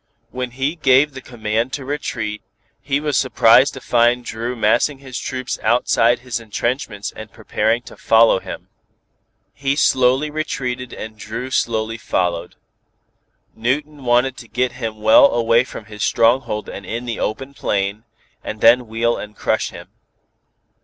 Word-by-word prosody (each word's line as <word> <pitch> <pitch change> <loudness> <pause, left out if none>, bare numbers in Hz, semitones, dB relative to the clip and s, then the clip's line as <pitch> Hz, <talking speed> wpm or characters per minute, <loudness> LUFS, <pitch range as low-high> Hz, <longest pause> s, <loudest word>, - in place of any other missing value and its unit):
When 125 0 -4
he 135 +6 -2
gave 140 0 +4
the 130 - -8
command 115 0 -2
to 140 - -4
retreat, 115 -7 -4 0.4
he 140 0 0
was 150 -1 -2
surprised 130 +1 +4
to 130 - -8
find 120 +1 +2
Dru 115 +3 -4
massing 120 +6 +2
his 130 -2 -7
troops 130 -1 -4
outside 120 0 +2
his 125 -2 -3
entrenchments 115 -1 -3
and 110 -1 -9
preparing 110 +1 -1
to - - -12
follow 115 -3 +4
him. - - -9 0.8
He 140 0 -1
slowly 130 +1 +3
retreated 125 -5 -3
and 110 0 -8
Dru 110 +4 -5
as 130 - -3
slowly 115 0 -1
followed. 90 -5 -2 1.0
Newton 145 +5 -2
wanted 125 +2 +2
to 120 - -11
get 125 +2 -1
him 110 -3 -5
well 110 +5 +7
away 115 0 +3
from 115 - -10
his 105 0 -10
stronghold 115 -2 +2
and 100 - -8
in 115 +6 -5
the 120 -3 -4
open 135 +6 -3
plain, 100 -3 -2 0.4
and 110 - -6
then 120 +2 +5
wheel 115 +2 0
and 105 0 -8
crush - - 0
him. - - -11
120 Hz, 155 wpm, -20 LUFS, 110-130 Hz, 1.0 s, well